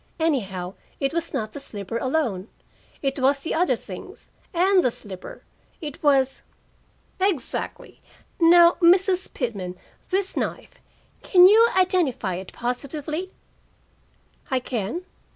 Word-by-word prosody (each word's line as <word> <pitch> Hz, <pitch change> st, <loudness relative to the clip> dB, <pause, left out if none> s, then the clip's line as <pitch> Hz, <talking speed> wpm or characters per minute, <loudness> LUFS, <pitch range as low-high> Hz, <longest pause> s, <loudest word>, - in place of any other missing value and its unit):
Anyhow, 195 Hz, -, -1 dB, 0.3 s
it 275 Hz, +2 st, 0 dB
was 335 Hz, 0 st, -2 dB
not 220 Hz, -7 st, -3 dB
the 285 Hz, -, -7 dB
slipper 210 Hz, -3 st, -5 dB
alone. 245 Hz, -8 st, -1 dB, 0.6 s
It 275 Hz, 0 st, -1 dB
was 275 Hz, +2 st, +2 dB
the 320 Hz, -, -3 dB
other 355 Hz, +3 st, +2 dB
things -, -, -11 dB, 0.2 s
and 370 Hz, +1 st, +3 dB
the -, -, +3 dB
slipper. 195 Hz, -5 st, -9 dB, 0.4 s
It 295 Hz, -3 st, -7 dB
was 270 Hz, -3 st, +2 dB, 0.4 s
" -, -, -38 dB
"Exactly. 290 Hz, -9 st, -5 dB, 0.4 s
Now, 340 Hz, +1 st, +7 dB
Mrs. 370 Hz, +2 st, +4 dB
Pitman, 195 Hz, -8 st, -4 dB, 0.3 s
this 385 Hz, +1 st, -1 dB
knife. -, -, -4 dB, 0.4 s
Can 360 Hz, -2 st, +6 dB
you 445 Hz, +4 st, +7 dB
identify 335 Hz, -, +1 dB
it 185 Hz, +1 st, -7 dB
positively?" 295 Hz, +8 st, -4 dB, 1.2 s
"I 260 Hz, -, +1 dB
can." 250 Hz, -, -4 dB
280 Hz, 120 wpm, -24 LUFS, 230-350 Hz, 1.2 s, Now